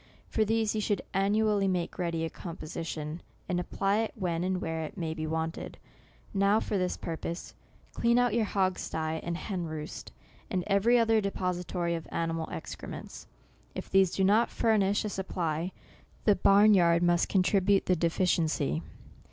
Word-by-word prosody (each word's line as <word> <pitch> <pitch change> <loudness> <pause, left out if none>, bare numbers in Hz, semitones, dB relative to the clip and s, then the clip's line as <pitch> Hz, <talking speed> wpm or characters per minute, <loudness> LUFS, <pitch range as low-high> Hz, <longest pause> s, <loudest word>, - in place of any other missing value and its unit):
For 220 - +1
these, 220 0 +1
you 215 - -1
should 205 -2 0
annually 205 +1 +2
make 180 -1 -2
ready 165 -2 -1
a - - -3
composition, 160 -1 -6 0.3
and 180 -1 0
apply 195 +3 0
it 225 - -1
when 175 -5 -1
and 185 0 0
where 160 -1 -3
it 155 - -7
may 165 -3 -2
be 155 0 -4
want 160 +1 -2
ed. - - -8 0.6
Now, 200 +2 +3
for 210 - -3
this 185 -2 0
purpose, 170 +1 -5 0.4
clean 235 +1 +2
out 245 -3 +3
your 230 -1 +2
hog 190 -2 0
sty 160 0 -2
and 170 0 -3
hen 185 -3 -3
roost, 155 -1 -6 0.4
and 185 -2 -1
every 210 +4 +4
other 225 -2 +3
de 200 - 0
pository 180 -2 -2
of 165 - -6
animal 165 -1 -2
excrements. - - -7 0.5
If - - -6
these 195 -1 +5
do 190 - +1
not 210 +5 +4
furnish 205 -3 +2
a - - -1
supply, 175 -3 -2 0.5
the 210 - +5
barn 200 +2 +6
yard 170 -2 +4
must 175 0 +3
con 190 -2 +3
tribute 195 +1 +3
the 185 - +3
deficiency. 165 - +1
185 Hz, 170 wpm, -29 LUFS, 165-205 Hz, 0.6 s, barn